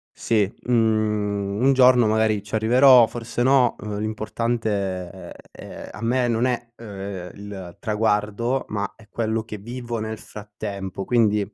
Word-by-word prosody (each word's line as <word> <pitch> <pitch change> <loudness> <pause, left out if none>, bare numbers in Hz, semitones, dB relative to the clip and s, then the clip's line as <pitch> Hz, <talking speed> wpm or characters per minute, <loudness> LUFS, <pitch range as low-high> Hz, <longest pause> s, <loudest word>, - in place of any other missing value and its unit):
Sì, 110 -2 +1 0.2
mhmm, 105 -3 +1
un 135 +1 +5
giorno 125 -2 +6
magari 110 -1 +2
ci 105 +1 -10
arriverò, 125 +3 +6
forse 115 +1 -4
no, 130 -1 +4
ehm, 105 -1 -5
l'importante 110 -3 -2
è, - - -10 0.2
ehm - - -10
a 105 - -10
me 120 +2 +1
non 115 0 +1
è, 120 -2 -1
ehm, 100 -4 -7
il 100 -3 -9
traguardo, 110 +3 0
ma 105 -1 -3
è 110 -2 -19
quello 110 +1 -1
che 110 -1 -7
vivo 120 +2 -6
nel 110 0 -4
frattempo. 100 -3 -7
Quindi 110 -4 +3
110 Hz, 145 wpm, -23 LUFS, 105-120 Hz, 0.2 s, giorno